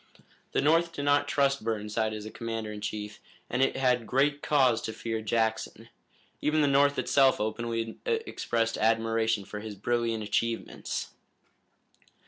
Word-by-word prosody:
The - - +2
North 165 +3 +3
did 145 -3 -4
not 145 0 +3
trust 140 -3 +1
Burnside 110 0 -1
as 110 -1 -6
a 110 - -7
commander 115 -2 -4
in 105 -1 -7
chief, 105 +1 -5 0.3
and 125 - 0
it 135 - +2
had 125 -3 +2
great 145 +2 +2
cause 130 -6 +3
to 110 - -4
fear 115 -1 -3
Jackson. 110 0 -1 0.5
Even 155 +1 +2
the - - +3
North 140 +1 +4
itself 135 -2 +3
openly 115 +1 -3
expressed 120 - -1
admiration 115 -1 +1
for 105 - -7
his 105 -1 -7
brilliant 115 +1 -1
achievements. 115 +2 -2
115 Hz, 145 wpm, -28 LUFS, 110-140 Hz, 0.5 s, North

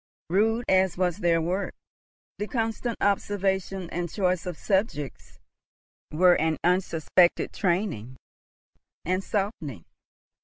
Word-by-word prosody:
Rude 225 +5 +2
as 190 -2 +3
was 180 -2 +1
their 170 -4 +2
work, 180 +5 -2 0.6
the 210 - -2
constant 225 0 -2
observation 195 -2 0
and 175 -1 -3
choice 185 -3 0
of 175 -3 -4
subjects 190 - -2 0.7
were 180 +3 +5
an 160 0 +1
unsuspected 175 -1 +2
training 170 - -1 0.9
and 185 +3 0
softening. 170 - -3
185 Hz, 105 wpm, -26 LUFS, 170-200 Hz, 0.9 s, were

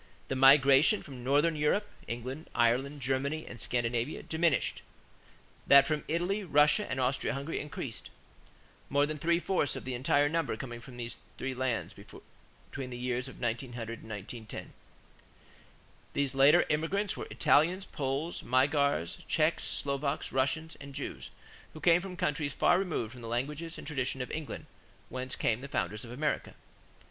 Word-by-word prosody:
The 135 - 0
migration 135 +7 +6
from 130 -4 -9
Northern 145 +5 +3
Europe 155 +8 +1 0.2
England, 130 +6 -5
Ireland, 130 +5 +2
Germany, 140 +4 -1
and 120 - -9
Scandinavia 120 +3 -1
diminished; 160 -4 +1 0.9
that 140 0 +8
from 150 0 -1
Italy, 175 +6 0
Russia, 150 +4 +4
and 130 0 -2
Austria 130 +1 0
Hungary 140 +4 -3
increased, 110 - -6 0.8
more 145 +1 +3
than 155 +1 -4
three 170 +3 +2
fourths 175 -4 0
of - - -7
the 130 - -3
entire 140 +3 +3
number 165 -6 -1
coming 120 0 -6
from 125 0 -11
these 120 -1 -6 0.2
three 135 0 -3
lands 130 -3 -2
between 135 -2 -11
the 120 - -6
years 125 +1 -2
1900 120 -2 -4
and 110 - -12
1910. 110 +2 -7 1.4
These 140 -2 0
later 135 +2 +6
immigrants 170 +7 0
were - - -6
Italians, 175 +6 +3
Poles, 140 +4 -2
Magyars, 135 - +2
Czechs, - - +2
Slovaks, 140 +1 -2
Russians, 140 +5 0
and 140 -1 -9
Jews, - - -5 0.4
who 155 - -9
came 170 +2 +5
from 185 -1 -7
countries 150 -6 -1
far 175 - +4
removed 160 - -2
from 125 -1 -11
the 115 - -7
language 135 +7 -2
and 165 -1 -6
the - - -7
traditions 135 -3 -2
of - - -8
England 155 -2 -5 0.4
whence 130 +1 -4
came 115 +1 0
the 140 - -6
founders 105 -5 -2
of 120 - -9
America. 145 +5 -2
140 Hz, 155 wpm, -31 LUFS, 125-155 Hz, 1.4 s, that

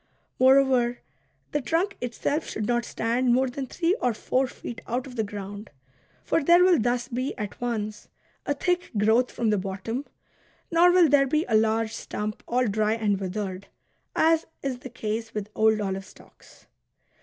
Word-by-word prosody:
Moreover, 260 -2 +4 0.5
the 295 - 0
trunk 340 +10 0
itself 250 +5 -2
should 215 - -3
not 240 +1 0
stand 240 +2 0
more 260 +1 +2
than 260 +1 -5
three 345 +7 0
or 245 -3 +1
four 260 +4 0
feet 235 -1 -8
out 245 +2 -2
of 255 -2 -10
the 220 - 0
ground. 205 0 -7 0.5
For 330 - +1
there 345 +4 +6
will 360 -3 +5
thus 245 +1 0
be 255 +2 -3
at 210 +1 -6
once 215 -3 -3 0.4
a 285 - +1
thick 355 +4 0
growth 220 +4 +3
from 225 -2 0
the 210 - +2
bottom, 195 +8 -4 0.7
nor 345 +2 +6
will 355 -2 +6
there 275 -1 +4
be 305 +4 +1
a 230 - -2
large 220 0 +2
stump, 210 0 -5
all 250 +1 +1
dry 215 0 +1
and 210 -3 0
withered, 190 0 -4 0.5
as 325 0 +3 0.2
is 265 -3 -2
the 260 - -9
case 225 -2 -4
with 210 -1 -4
old 220 0 +3
olive 195 -1 -3
stocks. - - -19
240 Hz, 170 wpm, -26 LUFS, 215-270 Hz, 0.7 s, there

